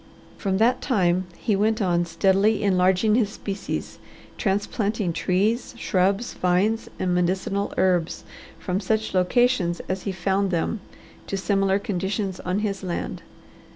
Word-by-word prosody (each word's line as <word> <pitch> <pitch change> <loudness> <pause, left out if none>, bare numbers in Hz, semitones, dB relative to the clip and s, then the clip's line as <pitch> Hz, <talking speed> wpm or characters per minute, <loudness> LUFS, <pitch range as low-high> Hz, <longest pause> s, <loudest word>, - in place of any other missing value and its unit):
From 190 -2 -1
that 240 +4 +3
time 185 -7 +1
he 210 - 0
went 215 +2 +1
on 175 -4 +1
steadily 195 +5 +2
enlarging 190 +2 +3
his 220 -3 +3
species, 200 -1 -5 0.4
transplanting 205 -1 -1
trees, 210 +9 0
shrubs, 195 +3 +1
vines, 190 +5 +1
and 180 -1 0
medicinal 185 +3 0
herbs 180 -3 +1 0.3
from 185 0 -2
such 220 +2 -1
locations 185 -1 +2
as 185 0 -2
he 195 - -3
found 190 +1 0
them 180 +5 -1 0.5
to 195 - -2
similar 195 0 +2
conditions 195 -1 -2
on 185 +3 -1
his 200 -3 -2
land. 180 -3 -4
195 Hz, 130 wpm, -24 LUFS, 185-210 Hz, 0.5 s, that